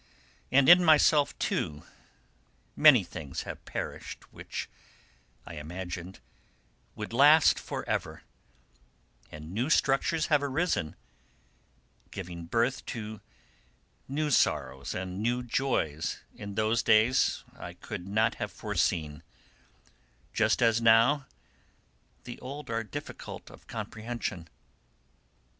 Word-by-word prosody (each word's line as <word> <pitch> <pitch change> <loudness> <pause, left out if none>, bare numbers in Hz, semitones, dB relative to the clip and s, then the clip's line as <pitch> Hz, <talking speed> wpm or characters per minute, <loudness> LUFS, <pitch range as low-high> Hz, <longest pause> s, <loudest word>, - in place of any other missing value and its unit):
And 135 0 +5
in 175 +1 +9
myself, 155 -2 +4
too, 75 -1 -2 0.9
many - - +7
things 70 -4 -6
have - - -8
perished - - -7
which, - - -6 0.8
I 85 - -9
imagined, 90 +1 -7 0.7
would 105 +1 -6
last 145 +5 +6
for - - -6
ever, - - -3 1.1
and 75 +2 -9
new 120 +9 -1
structures 150 +2 +2
have 150 -3 +3
arisen, 140 - -1 1.1
giving 85 -3 -7
birth 120 +6 0
to 110 -2 -6 0.9
new 150 +2 -1
sorrows 65 - +1
and 95 +1 -4
new 120 +2 0
joys 115 - -1
which - - -19
in 100 -1 -6
those 110 +2 +1
days 115 +4 +3
I - - -8
could 90 - -7
not 110 +3 +2
have - - -3
foreseen, 75 -2 -1 1.1
just - - +2
as 115 0 +3
now 115 +5 +4 1.0
the 120 - -8
old 140 -1 -7
are 115 0 -1
difficult 105 - -8
of - - -16
comprehension. 110 -6 -5
115 Hz, 110 wpm, -29 LUFS, 90-135 Hz, 1.1 s, in